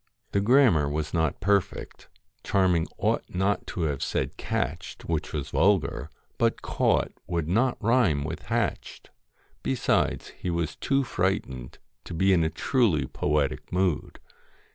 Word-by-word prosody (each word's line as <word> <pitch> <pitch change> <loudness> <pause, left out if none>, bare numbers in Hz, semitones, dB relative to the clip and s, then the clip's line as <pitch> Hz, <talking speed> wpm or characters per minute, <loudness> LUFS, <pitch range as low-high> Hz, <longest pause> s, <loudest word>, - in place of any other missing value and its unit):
The 100 - +1
grammar 110 - +4
was 75 +1 -3
not 80 -4 0
perfect; 100 -1 -1 0.3
Charming 90 -4 +2
ought - - +1
not 95 +3 0
to 95 - -4
have 75 -4 -1
said - - -1
'catched,' 80 +6 -3
which 80 -2 -2
was 75 -4 -4
vulgar, 85 -7 +2 0.3
but - - +1
'caught' - - +1 0.2
would 85 -3 -1
not 120 +9 +2
rhyme 110 - +2
with 80 +2 -6
'hatched.' - - -2 0.5
Besides 65 0 0
he 90 - -6
was 85 -1 -1
too 135 0 +1
frightened 90 - -2 0.3
to - - -6
be 95 +3 +3
in 85 -3 +3
a 80 - +1
truly 85 - +1
poetic 75 +1 -1
mood. 90 -3 0
85 Hz, 140 wpm, -27 LUFS, 75-100 Hz, 0.5 s, grammar